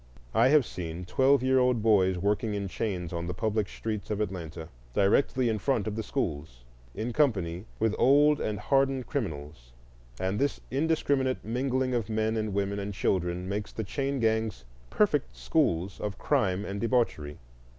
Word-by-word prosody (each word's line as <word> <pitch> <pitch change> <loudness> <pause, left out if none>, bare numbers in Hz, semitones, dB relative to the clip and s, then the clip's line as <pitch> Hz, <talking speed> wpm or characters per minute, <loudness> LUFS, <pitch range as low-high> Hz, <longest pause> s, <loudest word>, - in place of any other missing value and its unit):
I 115 +3 +5
have 145 -1 +5
seen 85 -2 -6
twelve 135 +6 +3
year 130 0 +4
old 125 -3 +2
boys 95 -4 +4
working 105 +3 0
in 100 -1 -2
chains 90 -3 -3
on 85 0 -3
the 90 - -4
public 110 -1 -1
streets 105 -3 -5
of 105 -1 -1
Atlanta, 85 -5 -4 0.3
directly 125 +5 +3
in 110 -2 0
front 120 -4 0
of 105 - -3
the 110 - -2
schools, 75 - -4 0.3
in 115 +2 -3
company 95 - +1
with 110 -1 +1
old 145 +3 +5
and 105 -1 -2
hardened 135 +2 +1
criminals; 75 - -5 0.5
and 95 +2 -1
this 140 0 0
indiscriminate 140 -2 0
mingling 130 +2 0
of 115 -4 -1
men 110 0 0
and 110 -1 -1
women 100 +1 -1
and 100 0 -4
children 90 -1 -1
makes 100 +1 -3
the 110 - -4
chain 135 +6 -2
gangs 110 - 0 0.2
perfect 150 -9 +1
schools 100 - 0
of 105 -1 -4
crime 95 -1 +1
and 100 0 -4
debauchery. 115 - 0
110 Hz, 165 wpm, -28 LUFS, 95-130 Hz, 0.5 s, I